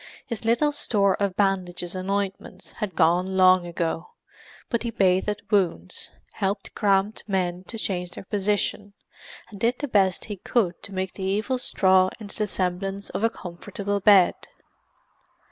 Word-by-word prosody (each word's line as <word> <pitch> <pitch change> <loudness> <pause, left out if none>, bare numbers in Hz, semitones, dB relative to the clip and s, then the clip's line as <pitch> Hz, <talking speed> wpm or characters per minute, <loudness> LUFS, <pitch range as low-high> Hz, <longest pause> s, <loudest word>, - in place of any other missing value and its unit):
His 230 -3 -5
little 240 +6 +3
store 200 -9 +2
of 200 -2 0
bandages 180 -3 0
and 185 0 -5
ointment 195 -1 -3
had 205 -6 -4
gone 180 +3 +2
long 185 -1 +5
ago, 170 - -3 0.5
but 235 - -1
he 235 - -2
bathed 195 0 +1
wounds, 170 - 0 0.2
helped 195 +1 -3
cramped 200 0 +1
men 180 -2 -1
to 225 - -5
change 180 -4 -2
their - - -9
position, 205 0 -1 0.6
and 200 - -10
did 235 +4 +1
the 290 - -3
best 195 -6 +2
he 205 -2 -6
could 185 -3 0
to - - -7
make 190 -1 -3
the 195 - -7
evil 210 +7 0
straw 185 -5 +3
into 205 -2 -8
the 210 -2 -1
semblance 195 +1 -2
of - - -3
a 225 - +4
comfortable 200 +1 -4
bed. 200 -3 +6
195 Hz, 155 wpm, -25 LUFS, 185-210 Hz, 0.6 s, bed